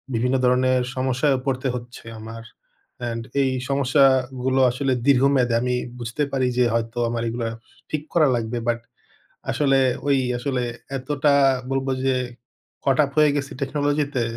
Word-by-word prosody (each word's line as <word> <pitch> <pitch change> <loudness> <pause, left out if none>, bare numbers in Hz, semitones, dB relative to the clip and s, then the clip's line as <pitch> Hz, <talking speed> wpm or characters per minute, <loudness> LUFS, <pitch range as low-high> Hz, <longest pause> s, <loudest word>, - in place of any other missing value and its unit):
বিভিন্ন 125 +3 +1
ধরনের 125 0 +3
সমস্যায়ও 130 +1 +1
পড়তে 130 0 -1
হচ্ছে 120 -1 -9
আমার। 115 +1 -8 0.6
অ্যান্ড 115 -1 -4 0.2
এই 135 -1 +2 0.2
সমস্যাগুলো 130 -1 +2
আসলে 130 +1 0
দীর্ঘমেয়াদী। 135 -3 +4
আমি 125 0 0 0.2
বুঝতে 120 +5 -2
পারি 130 -2 +1
যে 125 - +4
হয়তো 115 0 -2
আমার 115 0 -2
এইগুলা 115 0 -2 0.4
ঠিক 155 - -2
করা 160 -3 +4
লাগবে 115 +1 -2
বাট 120 0 +1 0.7
আসলে 135 -2 +2 0.3
ওই 140 -1 +4 0.2
আসলে 130 0 -2 0.4
এতটা 145 +2 +1 0.4
বলব 135 0 -1 0.2
যে 135 -1 +2 0.7
caught 135 -1 +2
up 140 - -5
হয়ে 150 -1 +6
গেছি 140 -1 -3
টেকনোলজি 145 +2 0
তে, 125 - +1
130 Hz, 140 wpm, -23 LUFS, 120-140 Hz, 0.7 s, হয়ে